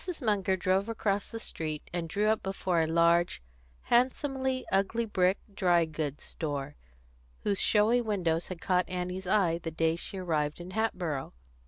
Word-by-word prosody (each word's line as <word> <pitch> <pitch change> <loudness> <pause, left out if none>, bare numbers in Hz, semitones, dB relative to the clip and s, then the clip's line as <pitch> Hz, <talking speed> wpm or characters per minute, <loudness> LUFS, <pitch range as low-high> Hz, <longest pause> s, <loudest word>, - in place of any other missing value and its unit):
Munger 200 -6 +1
drove 190 +3 +1
across 205 -3 -1
the 230 - -6
street, 155 -8 -4
and 170 -2 -3
drew 205 +5 0
up 220 0 +2
before 190 -2 -1
a 160 - +2
large, 170 - +3 0.4
handsomely 260 +1 +1
ugly 200 +4 +1
brick 190 -3 +2 0.2
dry 175 -3 +3
goods 150 -2 -4
store, 145 -2 -4 0.7
whose 200 -2 +1
showy 225 +3 +4
windows 175 -7 0
had 185 -3 -7
caught 180 -1 +1
Annie's 180 +1 -4
eye 180 -4 +2
the 165 - -4
day 160 0 +1
she 180 +3 -3
arrived 155 -5 -1
in 175 +1 -8
Hatboro'. 180 -10 -2
185 Hz, 155 wpm, -30 LUFS, 165-210 Hz, 0.7 s, showy